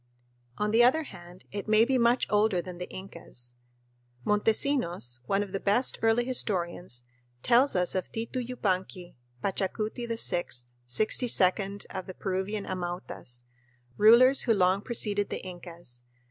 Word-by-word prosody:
On 210 0 0
the 230 +2 +5
other 270 +6 +4
hand, 180 - -13
it 205 +1 -5
may 215 +1 +5
be 260 0 +1
much 235 +1 +3
older 210 -3 +3
than 175 0 -7
the 180 - -6
Incas. 165 -10 -8 0.7
Montesinos, 210 - +1
one 195 +1 +1
of 200 - -9
the 195 - -2
best 210 +7 +2
early 225 +2 +3
historians, 175 - -2 0.4
tells 250 +2 +4
us 180 -1 +2
of 185 -2 -3
Titu 230 +3 -3
Yupanqui, 190 -7 -3 0.3
Pachacuti 215 +4 -2
VI, 225 -6 +1 0.4
sixty 215 - +2
second 195 -1 +2
of 185 -1 -6
the 185 - -8
Peruvian 195 +2 -3
Amautas, 175 -9 -6 0.5
rulers 240 +5 +6
who 230 -3 +2
long 185 0 +3
preceded 205 -3 +2
the - - -5
Incas. 175 -8 -8
200 Hz, 140 wpm, -28 LUFS, 180-230 Hz, 0.7 s, rulers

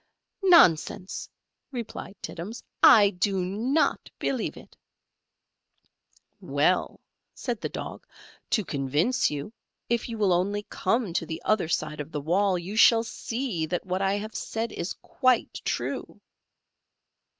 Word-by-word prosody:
"Nonsense!" 200 - +4 0.4
replied 235 -5 -6
Tittums: 200 +8 -6 0.2
"I 205 -3 +8
do 195 +1 0
not 235 - 0
believe 255 -4 -2
it." - - -14 1.6
"Well," - - +1 0.4
said 240 -5 -4
the - - -2
Dog, - - -7 0.4
"to 215 - +1
convince 145 - +1
you, 145 +8 -5 0.4
if 235 0 0
you 230 - -4
will 200 -4 +3
only 200 +4 0
come 200 -1 0
to 165 - 0
the 160 0 -4
other 215 -6 +2
side 150 -2 -2
of 150 +2 -6
the 150 - -3
wall 185 +5 +2
you 180 +4 -6
shall 225 +1 +6
see 225 -6 -3
that 175 +3 -3
what 185 +1 -2
I 195 0 +2
have 215 +2 -5
said 225 0 -3
is 175 - -4
quite 255 -3 +1
true." - - -3
200 Hz, 130 wpm, -27 LUFS, 175-230 Hz, 1.6 s, I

